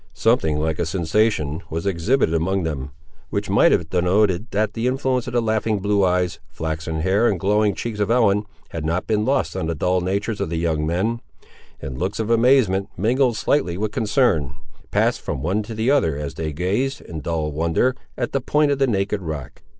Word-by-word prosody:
Something 110 -10 +2
like 80 0 -1
a 85 - +1
sensation 85 -2 0
was 80 +2 -4
exhibited 100 +2 +1
among 90 +3 0
them, 75 -4 -3 0.4
which - - -2
might - - +5
have 80 -2 +1
denoted 95 +3 +2
that 105 0 0
the 115 +2 -1
influence 130 -1 0
of - - -5
the 120 - +2
laughing 110 -1 0
blue 100 0 +1
eyes, 90 -1 +1
flaxen 80 0 -4
hair, 100 +7 +3
and 95 -6 0
glowing 105 +2 +2
cheeks 115 -3 -4
of 105 0 0
Ellen, 105 -4 +3 0.2
had 80 - -5
not 85 +3 -1
been 110 -1 0
lost 135 -4 0
on 95 -4 -2
the 85 - -1
dull 90 +4 +1
natures 100 +4 -2
of - - -1
the 85 - -2
young 80 -2 0
men; 110 +8 -1 0.6
and 65 -2 -6
looks 95 +5 -2
of 110 +1 -1
amazement, 115 -5 +3
mingled 120 +4 +2
slightly 90 -12 +1
with 105 +1 -2
concern, 105 - +1 0.3
passed - - +1
from - - -4
one 95 +6 0
to 110 +1 -7
the 110 +5 +1
other 80 - +2
as 75 -1 -4
they 80 -1 -4
gazed, 100 - -1
in 80 - -7
dull 80 -1 -2
wonder, 85 - +1 0.2
at 120 - -2
the 135 - 0
point 150 +3 +2
of 140 - 0
the 135 - +3
naked 100 -2 0
rock. 75 -7 -6
100 Hz, 200 wpm, -22 LUFS, 80-115 Hz, 0.6 s, might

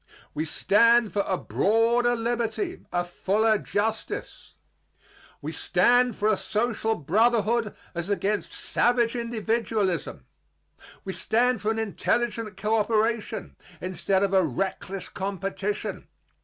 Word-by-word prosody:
We 155 - -2
stand 230 +7 +3
for 205 - +2
a 185 - 0
broader 235 +5 +2
liberty, 240 - -2
a 175 0 +1
fuller 210 +5 +1
justice. 220 +2 -3 0.9
We - - -3
stand 245 -1 +3
for 210 - 0
a 215 -2 +3
social 225 0 0
brotherhood 220 - +2 0.2
as 170 +1 -4
against 205 +1 -1
savage 240 -1 +1
individualism. 220 - -1 0.8
We 190 - -3
stand 245 +2 +1
for 210 - 0
an 220 - 0
intelligent 225 +1 -1
coöperation 220 +2 0 0.3
instead 185 +2 0
of 195 -1 0
a 190 -1 +5
reckless 190 +5 -3
competition. 195 +1 -4
215 Hz, 110 wpm, -26 LUFS, 195-235 Hz, 0.9 s, a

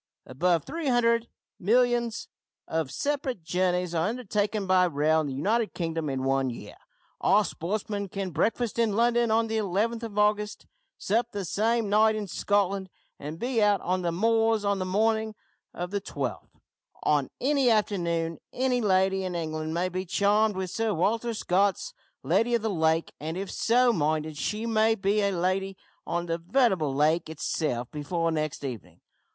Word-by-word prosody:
Above 165 +4 +1
three 325 0 -4
hundred 235 -2 +2 0.3
millions 235 +2 +1 0.4
of 160 -4 -1
separate 265 - -2
journeys 180 +1 0
are 165 +2 +1
undertaken 210 -3 -1
by 185 -1 +4
rail 160 -1 +2
in 150 - -3
the 135 - -4
United 215 - 0
Kingdom 165 -3 -2
in 135 -1 -2
one 135 0 +1
year. 120 - -8 0.5
Our 210 +1 +4
sportsmen 200 +3 -3
can 195 0 -4
breakfast 225 +8 0
in 225 -3 +2
London 235 +1 +3
on 225 +1 +3
the 225 0 -2
11th 215 +4 -1
of 220 -3 -7
August, 210 0 +1 0.3
sup 230 +4 0
the 200 -2 -4
same 225 +5 +1
night 215 +2 +4
in 215 -1 -3
Scotland, 200 0 0 0.3
and 150 +3 -6
be 240 +2 0
out 205 -1 +4
on 185 +1 -1
the 175 -1 -1
moors 225 +3 +2
on 200 -1 +1
the 185 - -2
morning 220 +2 +1 0.4
of 180 +1 -5
the 200 -1 -1
12th. 130 - -5 0.5
On 145 -3 +2
any 275 -1 +2
afternoon 170 -7 0
any 250 -1 0
lady 190 -2 +2
in 185 -1 -3
England 155 -1 -3
may 175 +3 0
be 185 +1 -3
charmed 205 +3 +2
with 185 -1 -3
Sir 225 -3 -1
Walter 225 +7 0
Scott's 200 - 0 0.3
`Lady 235 +1 +2
of 230 - -1
the 220 - 0
Lake,' 160 -2 +1
and, 160 +3 -4
if 195 +1 -4
so 245 +1 +3
minded, 155 -2 -1
she 210 +8 -2
may 225 -1 +3
be 205 0 +1
a 200 - +2
lady 190 +2 -1 0.3
on 170 0 -1
the 165 0 -2
veritable 185 - +2
lake 155 +4 +1
itself 145 -5 -2
before 165 +3 -1
next 155 -2 -3
evening! 105 -10 -7
195 Hz, 170 wpm, -27 LUFS, 165-225 Hz, 0.5 s, by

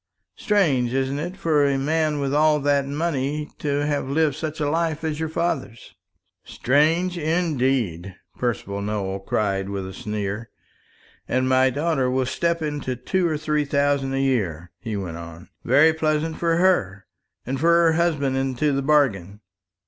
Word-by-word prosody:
Strange, 140 - +1
isn't 135 +1 -1
it, 175 +5 -5
for 160 -6 +2
a 140 -1 +2
man 155 +1 0
with 140 -1 -1
all 150 0 +4
that 140 -1 +1
money 150 -1 -2
to 145 0 -1
have 145 -2 -1
lived 150 -1 +1
such 155 0 -5
a 150 - 0
life 165 0 -1
as 155 -1 -2
your 160 -1 -2
father's?" 155 -8 -3 0.5
"Strange 165 +7 +1
indeed," 130 - 0 0.2
Percival 100 -5 -3
Nowell 100 -2 -3
cried 95 0 -1
with 100 -1 -4
a 95 - -8
sneer. 105 +2 -4 0.8
"And 130 +1 0
my 130 0 +4
daughter 140 -1 0
will 130 0 0
step 170 +5 -1
into 145 -4 -3
two 175 +9 0
or 155 -2 -1
three 150 0 0
thousand 140 -1 0
a - - 0
year," 95 - -1
he 105 +1 -4
went 90 -4 -5
on: 85 0 -10
"very 145 +6 +5
pleasant 155 0 -1
for 165 -1 +1
her, 110 - +1 0.4
and 135 +2 -3
for 165 +4 +3
her 170 -1 +5
husband 160 -5 +1
into 135 +2 0
the 135 - 0
bargain. 115 - +1
140 Hz, 160 wpm, -23 LUFS, 120-155 Hz, 0.8 s, very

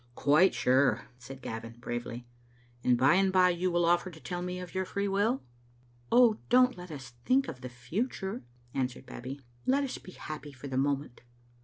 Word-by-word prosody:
"Quite 155 +7 +4
sure," 130 +2 +2
said 130 +2 -10
Gavin, 115 +1 -5
bravely. 120 0 -5 0.6
"And 125 -1 +4
by 130 +5 +5
and 190 +1 +3
by 185 -1 +5
you 180 +1 0
will 175 -1 +2
offer 175 +2 +3
to 160 -3 -12
tell 175 +2 -4
me 180 0 -3
of 180 -2 -8
your 190 - 0
free 200 +2 -2
will?" 205 +6 +1 0.7
"Oh, 235 -3 +6
don't 250 +1 +5
let 180 0 -9
us 135 -5 -8
think 265 +1 +3
of 130 -5 -7
the 125 - -6
future," 190 - -3 0.3
answered 130 -1 -2
Babbie. 130 +2 -7 0.2
" 120 - -31
Let 275 +2 +3
us 270 - -4
be 185 - -12
happy 150 -2 -7
for 130 +2 -9
the 135 - -4
moment." 140 -1 -1
170 Hz, 190 wpm, -30 LUFS, 130-190 Hz, 0.7 s, Oh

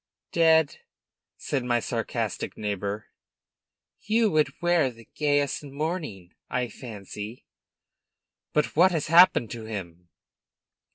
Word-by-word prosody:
" - - -63
dead?" 160 -2 +4 0.6
said 135 -3 -2
my 120 -1 +1
sarcastic - - -3
neighbor. 105 0 -3 0.9
"You 220 0 +2
would 155 -1 +1
wear 175 -5 +3
the 115 -2 -14
gayest 145 -1 +1
mourning, 145 - -4 0.2
I 125 -1 -1
fancy!" 105 0 -8 1.1
"But 150 - 0
what 180 +4 +6
has 160 -4 -1
happened 165 - +6
to 115 -2 -6
him?" 90 -5 -7
130 Hz, 110 wpm, -26 LUFS, 105-160 Hz, 1.1 s, what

